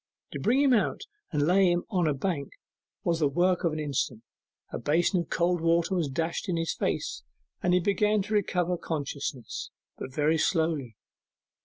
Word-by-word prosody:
To - - -5
bring 250 +5 +2
him 270 -2 +5
out 220 - +1 0.3
and 145 -3 +1
lay 185 +2 +4
him 175 0 0
on 180 -5 +2
a 150 - +1
bank 140 -2 -2 0.5
was 170 -1 +1
the 150 - +3
work 175 +6 +2
of 170 - +2
an 155 - -4
instant; 135 -6 -2 0.5
a - - -4
basin 175 +5 +2
of 170 - -4
cold 175 0 +1
water 165 +2 +2
was 170 -6 0
dashed 165 +7 -2
in 175 - 0
his 165 0 -1
face, - - -2 0.4
and 180 0 +3
he - - +4
began 205 +2 +2
to 215 +2 -5
recover 180 -3 +1
consciousness, 140 -5 -4 0.3
but - - -6
very 155 +3 +2
slowly. 160 - 0
170 Hz, 180 wpm, -28 LUFS, 150-180 Hz, 0.5 s, him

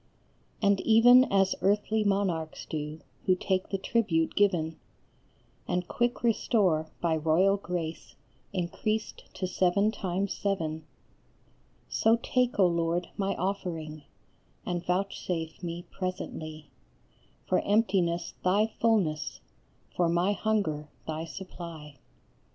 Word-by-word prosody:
And 200 -1 +4
even 245 +3 +7
as 195 -3 +2
earthly 210 +3 +2
monarchs 190 -6 -1
do, 150 0 -5 0.3
who 185 - +5
take 185 0 -1
the 195 - -1
tribute 190 -6 +1
given, 175 -6 +1 0.9
And 180 0 -1
quick 240 0 -1
restore, 195 -8 +2
by 165 -2 +2
royal 165 +6 +3
grace 170 -4 -5 0.4
increased 200 +4 -2
to 185 - -2
seven 185 +3 +2
times 195 -1 -2
seven, 160 -6 -2 1.0
So 225 +1 +3
take, 250 -1 +1
O 195 - +6
Lord, 170 0 0
my 195 -1 -1
offering, 165 -5 -3 0.6
and 175 -1 -2
vouchsafe 180 -3 -2
me 170 -1 -5
presently, 155 -5 -5 0.7
For - - +2
emptiness 185 -5 +1
thy 210 +4 +2
fulness, 160 -11 +1 0.6
for 175 -2 +2
my 175 +4 +2
hunger 180 -9 -1 0.2
thy 160 +1 -3
supply. 165 -5 -9
180 Hz, 110 wpm, -29 LUFS, 160-200 Hz, 1.0 s, even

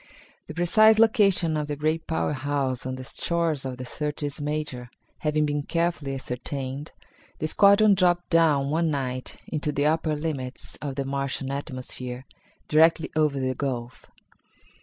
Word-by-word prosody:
The 155 - -8
precise 215 +6 +5
location 200 -7 +4
of 150 -1 -1
the 145 - -3
great 155 +2 -1
power 160 -2 0
house 135 -2 -2
on 130 - -3
the 130 - -7
shores 165 0 -1
of 130 -1 -4
the 130 - -6
Syrtis 145 +2 -4
Major 145 -5 -3 0.3
having 150 0 +1
been 145 0 -1
carefully 165 -3 -1
ascertained, 135 +2 -5 0.5
the - - -3
squadron 200 +4 +6
dropped 175 -2 +2
down 150 -4 +3
one 165 +1 +1
night 130 -3 -3
into 150 -1 -2
the 145 0 0
upper 155 0 +1
limits 145 -4 -4
of 140 -2 -4
the 140 -1 -2
Martian 135 0 -2
atmosphere, 130 -2 -6 0.4
directly 160 +1 +4
over 150 -3 +2
the 130 0 0
gulf. 125 -3 -4
150 Hz, 150 wpm, -26 LUFS, 135-160 Hz, 0.5 s, squadron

